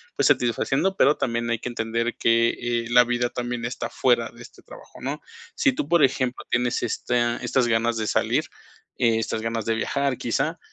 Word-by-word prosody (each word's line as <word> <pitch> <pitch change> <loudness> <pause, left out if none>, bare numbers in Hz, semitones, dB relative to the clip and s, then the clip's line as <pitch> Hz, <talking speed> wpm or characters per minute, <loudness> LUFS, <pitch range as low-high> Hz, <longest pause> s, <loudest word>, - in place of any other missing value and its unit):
pues, - - +2
satisfaciendo. 135 +9 +1
Pero 150 -4 +4
también 120 -1 -1
hay 115 - +1
que 120 - -5
entender 115 0 -2
que, 115 0 +3
eh, 120 -1 -2
la 125 0 +7
vida 120 0 -1
también 120 -1 -4
está 120 - -4
fuera 120 -2 +1
de 120 0 -13
este - - -15
trabajo, - - -14
¿no? 140 +3 -3 0.4
Si 280 - +2
tú, 145 - -3
por 170 -2 +4
ejemplo, 130 -2 0
tienes 120 0 0
esta 120 -1 0
estas 130 -2 0
ganas 115 0 +1
de 110 - -2
salir, - - +1 0.6
eh, 115 -2 +3
estas 110 0 -2
ganas 115 -1 -3
de 115 - +1
viajar, 140 +3 -1
quizá, 140 +8 -1
120 Hz, 190 wpm, -24 LUFS, 115-130 Hz, 0.6 s, la